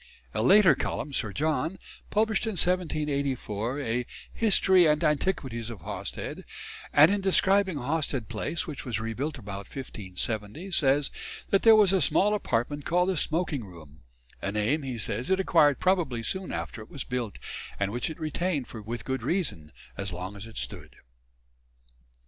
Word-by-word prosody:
A - - 0
later 190 - +7
Cullum, 145 - -3
Sir 110 -5 -1
John, 155 - -1 0.3
published 220 +1 +1
in 220 - -1
1784 140 - -1
a 120 -1 -1 0.3
"History 190 -5 +4
and 150 +1 +2
Antiquities 140 - 0
of 110 -7 -8
Hawsted," - - -5 0.5
and 150 +5 +7
in 205 0 0
describing 190 -2 +3
Hawsted 140 -3 -1
Place, 115 +9 -2
which 150 -4 -6
was 115 -4 -2
rebuilt 120 +8 -3
about 100 -3 -7
1570, 110 - -4
says 140 -3 +3 0.4
that 195 - +4
there 225 -1 +8
was 205 -3 +5
a 190 - +3
small 200 +8 +3
apartment 145 - -1
called 180 +4 +2
the 190 - +1
smoking 155 -4 +1
room 80 -6 -13 0.4
"a 100 - -2
name," 105 +9 +1
he 130 -3 -4
says, 115 - -2
"it 190 0 +3
acquired 150 -6 +4
probably 170 -11 +1
soon 190 - -3
after 110 - -5
it 110 - -12
was 140 - -5
built; 120 -5 -3 0.4
and 100 0 0
which 120 +7 -1
it 160 - -8
retained 155 -2 -1
with 110 +1 -6
good 130 0 -2
reason, 105 - -1 0.3
as 100 -2 -3
long 90 +3 -6
as 100 +2 -8
it 115 - -11
stood." - - -5
140 Hz, 160 wpm, -28 LUFS, 115-180 Hz, 0.5 s, there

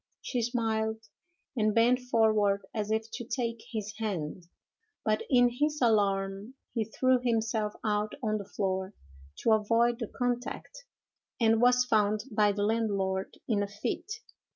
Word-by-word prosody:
She 245 - -2
smiled, 220 -2 0 0.6
and 215 -3 +1
bent 240 +2 +4
forward 215 -5 +2
as 215 -2 -2
if 220 +1 -1
to 240 - -4
take 230 -1 -3
his 215 -2 -4
hand; 180 -5 -3 0.6
but 215 -1 +2
in 245 -2 +6
his 300 0 +1
alarm 200 0 +1 0.2
he 225 -3 0
threw 255 +3 +2
himself 220 -3 0
out 210 -1 0
on 215 -1 0
the 200 - -9
floor 190 0 -2 0.5
to 230 - +4
avoid 230 +2 +3
the 225 - -3
contact, 245 - -4 0.5
and 225 -1 +4
was 250 0 +5
found 215 -3 +2
by 210 -1 +3
the 205 0 -2
landlord 200 -4 -1
in 210 -4 +1
a 205 - -1
fit. 205 - -4
220 Hz, 145 wpm, -29 LUFS, 205-240 Hz, 0.6 s, in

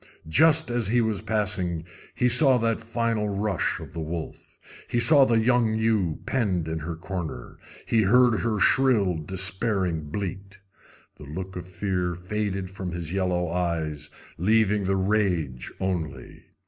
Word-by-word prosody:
Just 160 - +4
as 120 -4 0
he 120 +4 +2
was 110 -3 0
passing 95 -6 -1 0.3
he 125 - +2
saw 125 +2 +7
that 115 -1 -1
final 115 -2 -1
rush 100 -2 -1
of - - -11
the 85 - -6
wolf. 80 +1 -7 0.3
He 120 - 0
saw 135 +3 +7
the 120 -3 +2
young 115 -1 +2
ewe 110 -7 0
penned 95 -10 -1
in 80 0 -3
her 80 +2 -5
corner. 85 -7 -7 0.3
He 115 - +2
heard 120 +2 +4
her 110 -3 -1
shrill, 110 -6 +3
despairing 95 -1 0
bleat. 100 +2 -6 0.6
The 75 - -11
look 95 +6 -7
of 90 -1 -7
fear 90 -1 -2
faded 95 +1 -4
from 95 -2 -6
his 85 -1 -5
yellow 90 -3 -1
eyes, 80 -4 -2 0.3
leaving 105 +1 +2
the 95 +1 +1
rage 95 -10 -1
only. 80 -8 -4
95 Hz, 150 wpm, -25 LUFS, 85-110 Hz, 0.6 s, saw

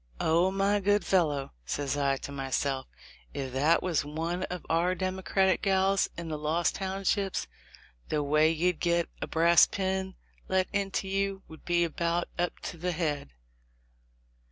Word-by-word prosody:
'Oh, 170 +3 +3
my 195 +2 +1
good 205 -1 +2
fellow 150 -8 +1
!' - - -38
says 145 -1 -1
I 140 -1 +1
to - - -7
myself, 135 0 -2 0.5
'if 130 -2 -4
that 150 +6 +3
was 175 -5 +1
one 165 +4 -3
of 180 -1 -6
our 170 +3 +2
Democratic 190 +1 +1
gals 195 0 +2
in 170 -1 -5
the 155 -2 -4
Lost 160 +3 +1
Townships, 195 0 -1 0.6
the 150 -1 0
way 150 +2 +4
you'd 165 +2 0
get 170 -1 +1
a - - -2
brass 170 +1 +5
pin 190 -1 -2 0.3
let 190 0 +1
into 195 -1 -1
you 195 0 -1
would 160 - -14
be 175 0 +2
about 170 +1 -1
up 175 0 -1
to 170 - -6
the 180 +2 -2
head.' 150 - -2
170 Hz, 155 wpm, -29 LUFS, 155-190 Hz, 0.6 s, brass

